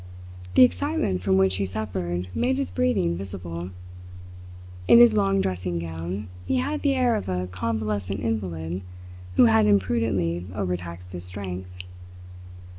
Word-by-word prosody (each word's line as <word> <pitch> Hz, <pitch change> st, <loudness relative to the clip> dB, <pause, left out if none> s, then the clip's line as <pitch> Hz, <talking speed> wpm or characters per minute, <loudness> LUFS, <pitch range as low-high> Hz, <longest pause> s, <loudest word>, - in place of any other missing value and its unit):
The -, -, +9 dB
excitement 90 Hz, -3 st, +1 dB
from 95 Hz, 0 st, +2 dB
which 95 Hz, 0 st, +3 dB
he 100 Hz, -, 0 dB
suffered 90 Hz, -3 st, -3 dB
made 260 Hz, +2 st, +1 dB
his 275 Hz, -, -2 dB
breathing 250 Hz, -, +1 dB
visible. 90 Hz, -2 st, -6 dB, 1.2 s
In -, -, +8 dB
his 240 Hz, -1 st, +8 dB
long 195 Hz, -2 st, +2 dB
dressing 90 Hz, -, -2 dB
gown 85 Hz, +4 st, -5 dB, 0.2 s
he -, -, -1 dB
had 295 Hz, +4 st, -1 dB
the 280 Hz, -2 st, +2 dB
air 250 Hz, -3 st, +3 dB
of 210 Hz, -, -3 dB
a 90 Hz, 0 st, -1 dB
convalescent 100 Hz, 0 st, -2 dB
invalid 90 Hz, -5 st, -3 dB, 0.5 s
who 125 Hz, -, +7 dB
had 110 Hz, -2 st, +5 dB
imprudently 95 Hz, -4 st, +1 dB
overtaxed 90 Hz, -2 st, -4 dB
his 90 Hz, 0 st, -6 dB
strength. 90 Hz, -1 st, -6 dB
95 Hz, 135 wpm, -25 LUFS, 90-115 Hz, 1.2 s, The